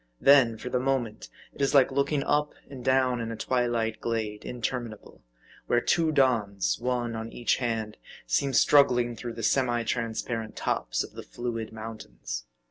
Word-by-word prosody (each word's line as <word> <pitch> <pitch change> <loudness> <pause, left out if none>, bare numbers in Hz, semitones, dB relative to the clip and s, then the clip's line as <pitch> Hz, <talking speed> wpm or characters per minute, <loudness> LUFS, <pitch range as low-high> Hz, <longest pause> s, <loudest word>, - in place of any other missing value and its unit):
Then, 135 -5 +6
for 125 - -6
the 125 - 0
moment, 125 -4 -2 0.2
it - - -9
is 140 +1 +2
like 135 -1 +6
looking 140 +1 +1
up 150 +1 0
and 135 -3 -9
down 130 -2 +2
in 115 0 -4
a - - -4
twilight 120 -1 -1
glade, 110 -2 -3
interminable; 120 -3 -5 0.5
where 120 - +3
two 160 +5 +2
dawns, 115 -9 +1
one 120 -1 -1
on 110 0 -5
each 120 - 0
hand, 115 -3 -2 0.3
seem 135 - 0
struggling 125 -3 +4
through 120 +1 -6
the 115 - -7
semi 120 0 +2
transparent 115 -1 -3
tops - - -1
of - - -10
the - - -7
fluid 115 -2 -5
mountains. 110 - -7
120 Hz, 160 wpm, -27 LUFS, 115-130 Hz, 0.5 s, Then